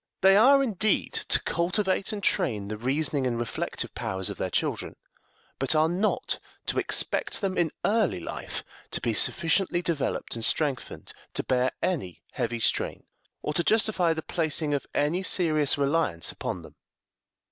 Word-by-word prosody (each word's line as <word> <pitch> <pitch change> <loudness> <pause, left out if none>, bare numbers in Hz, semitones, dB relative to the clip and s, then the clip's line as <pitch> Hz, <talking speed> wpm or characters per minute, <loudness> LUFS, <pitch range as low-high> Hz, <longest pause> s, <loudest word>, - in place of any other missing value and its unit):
They 195 +1 +7
are, 275 +6 +6
indeed, 215 -3 0
to - - +4
cultivate 185 +4 0
and 205 -2 -5
train 105 - 0
the 110 - -3
reasoning 135 +3 0
and 120 -2 -1
reflective 120 -1 -3
powers 95 0 -2
of - - -9
their - - -1
children, - - -2 0.6
but 135 +3 +2
are 155 +1 +4
not 185 +6 0 0.3
to - - 0
expect - - +1
them 195 -3 -1
in 170 -2 +2 0.2
early 210 - +2
life 85 - -6 0.3
to - - -1
be 115 - -1
sufficiently 175 - +2
developed 165 -6 -1
and 115 - -4
strengthened 140 0 -1 0.2
to - - 0
bear 130 0 +1
any 140 - -2
heavy 115 0 -2
strain, - - -1 0.4
or 150 - -2
to 170 - +1
justify 215 -5 +2
the 160 -1 -2
placing 155 -2 -1
of 140 - -2
any 155 +6 +1
serious 155 -7 +2
reliance 140 - 0
upon - - -5
them. - - -13
160 Hz, 160 wpm, -27 LUFS, 130-185 Hz, 0.6 s, They